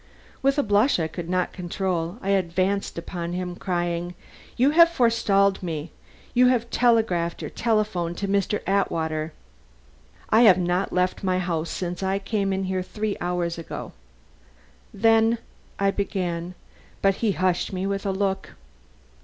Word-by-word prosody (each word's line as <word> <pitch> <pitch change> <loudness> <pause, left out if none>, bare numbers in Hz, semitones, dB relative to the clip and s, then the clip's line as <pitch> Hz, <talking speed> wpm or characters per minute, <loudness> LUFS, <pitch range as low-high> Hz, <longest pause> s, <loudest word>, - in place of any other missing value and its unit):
With 275 +2 +2
a 285 - +3
blush 205 +2 +3
I 160 - 0
could 170 +1 -7
not 180 0 0
control, 180 0 -2
I 195 - -2
advanced 190 +1 0
upon 170 0 -5
him, 180 0 -3
crying: 175 -1 -2 0.4
"You 260 +4 +4
have 335 +2 +7
forestalled 215 - +2
me. 160 -3 -4 0.4
You 250 0 +5
have 240 -2 +1
telegraphed 220 -9 +2
or - - -5
telephoned 210 -7 0
to 200 - -2
Mr. 200 +1 0
Atwater 160 -5 0 0.5
" 65 -1 -29
"I 220 - +6
have 200 -7 +7
not 180 +1 0
left 180 +1 0
my 185 -1 +1
house 170 -3 -2
since 175 0 -4
I 190 0 0
came 200 0 -1
in 190 0 -1
here 185 0 -1
three 210 +3 -3
hours 175 -1 -1
ago." 165 - -7 1.0
"Then 225 +1 +3 0.2
" - - -31
I - - +4
began. 180 -3 -3 0.5
But 195 -1 +3
he 220 -4 +1
hushed 185 -1 0
me 185 0 -3
with 195 0 -2
a 200 - 0
look. 190 0 -2
190 Hz, 155 wpm, -24 LUFS, 175-205 Hz, 1.0 s, have